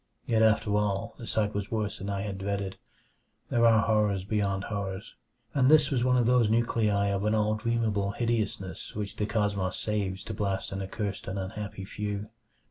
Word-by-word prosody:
Yet 115 Hz, -2 st, +2 dB
after 105 Hz, -1 st, +3 dB
all, 105 Hz, +2 st, 0 dB
the 115 Hz, -, -7 dB
sight 105 Hz, -1 st, 0 dB
was 100 Hz, +1 st, -3 dB
worse 105 Hz, -2 st, -2 dB
than 100 Hz, -, -4 dB
I 100 Hz, -1 st, -2 dB
had 100 Hz, -2 st, -4 dB
dreaded. 100 Hz, -1 st, -3 dB, 0.7 s
There 115 Hz, 0 st, +5 dB
are 110 Hz, -2 st, +5 dB
horrors 105 Hz, -4 st, +2 dB
beyond 100 Hz, -1 st, 0 dB
horrors, 100 Hz, -1 st, -4 dB, 0.4 s
and 135 Hz, -2 st, +4 dB
this 150 Hz, -2 st, +6 dB
was 125 Hz, -3 st, +1 dB
one 125 Hz, 0 st, +3 dB
of 120 Hz, -, +3 dB
those 120 Hz, -2 st, +4 dB
nuclei 110 Hz, -3 st, +2 dB
of 100 Hz, 0 st, -1 dB
all 105 Hz, 0 st, +2 dB
dreamable 110 Hz, -3 st, 0 dB
hideousness 105 Hz, -4 st, -2 dB
which 105 Hz, -1 st, -4 dB
the 105 Hz, -, 0 dB
cosmos 105 Hz, -4 st, 0 dB
saves 100 Hz, -3 st, -2 dB
to 110 Hz, -, -5 dB
blast 100 Hz, -2 st, -2 dB
an 95 Hz, 0 st, -3 dB
accursed 100 Hz, +1 st, -4 dB
and 95 Hz, -, -3 dB
unhappy 100 Hz, +1 st, -5 dB
few. 105 Hz, +1 st, -4 dB
105 Hz, 180 wpm, -29 LUFS, 100-110 Hz, 0.7 s, this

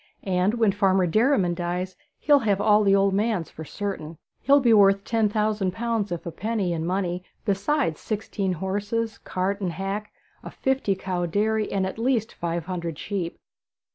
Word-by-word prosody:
And 190 Hz, +3 st, +1 dB
when 225 Hz, -4 st, +3 dB
Farmer 190 Hz, -2 st, +2 dB
Derriman 215 Hz, -, +2 dB
dies, 180 Hz, +1 st, -3 dB, 0.2 s
he'll 290 Hz, -1 st, +4 dB
have 205 Hz, -5 st, +1 dB
all 210 Hz, 0 st, +4 dB
the 195 Hz, -1 st, +4 dB
old 195 Hz, 0 st, +3 dB
man's, 205 Hz, -4 st, 0 dB
for 160 Hz, -, -8 dB
certain. 165 Hz, -3 st, -5 dB, 0.2 s
He'll 280 Hz, +2 st, +5 dB
be 240 Hz, -4 st, +4 dB
worth 195 Hz, -1 st, +5 dB
ten 225 Hz, -1 st, +1 dB
thousand 210 Hz, -3 st, 0 dB
pounds, 225 Hz, -3 st, -1 dB
if 175 Hz, -, -4 dB
a 170 Hz, -, -4 dB
penny, 200 Hz, 0 st, -1 dB
in 165 Hz, 0 st, -2 dB
money, 180 Hz, -1 st, -1 dB, 0.2 s
besides 200 Hz, -, 0 dB
sixteen 205 Hz, -3 st, -2 dB
horses, 205 Hz, +5 st, -2 dB
cart 195 Hz, +2 st, -2 dB
and 180 Hz, -3 st, -1 dB
hack, 195 Hz, +4 st, -4 dB, 0.3 s
a -, -, -7 dB
fifty 265 Hz, -7 st, 0 dB
cow 180 Hz, -2 st, -2 dB
dairy, 215 Hz, +4 st, 0 dB
and 195 Hz, -1 st, 0 dB
at 190 Hz, +4 st, -5 dB
least 235 Hz, -2 st, 0 dB
five 170 Hz, -1 st, -3 dB
hundred 170 Hz, -4 st, -4 dB
sheep.' 185 Hz, -5 st, -4 dB
195 Hz, 170 wpm, -25 LUFS, 180-220 Hz, 0.3 s, He'll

